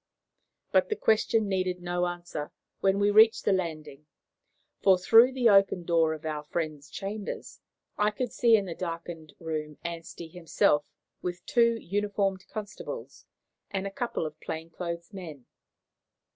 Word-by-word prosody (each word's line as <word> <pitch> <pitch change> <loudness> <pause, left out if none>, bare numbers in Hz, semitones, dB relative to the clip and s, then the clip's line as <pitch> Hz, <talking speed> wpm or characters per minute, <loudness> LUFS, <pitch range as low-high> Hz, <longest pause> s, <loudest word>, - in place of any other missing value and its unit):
But - - +3
the 430 - 0
question 220 - +2
needed 185 -2 -1
no 175 0 -1
answer 175 -4 -5 0.3
when 195 0 +2
we 205 +1 +3
reached 220 +2 +6
the 200 - +4
landing, 155 -5 -4 0.7
for 190 -2 +6
through 225 +7 +6
the 255 -2 +2
open 195 -3 +5
door 165 -2 +2
of 155 - -12
our 150 -1 -3
friend's 150 -2 -4
chambers 200 +5 -6 0.4
I 210 0 +4
could 240 +3 -4
see 235 -2 +5
in 205 -2 +1
the 175 - -4
darkened 165 -2 -6
room 155 -2 -4
Anstey 170 0 -6
himself 160 -3 +1 0.4
with 175 -1 -5
two 235 -1 +3
uniformed 200 -1 -1
constables 215 - -7 0.4
and 195 -1 -3
a 195 - -3
couple 235 -5 -2
of 155 -1 -7
plain 160 +1 -6
clothes 170 +2 -6
men. 160 -9 -9
180 Hz, 145 wpm, -28 LUFS, 160-205 Hz, 0.7 s, reached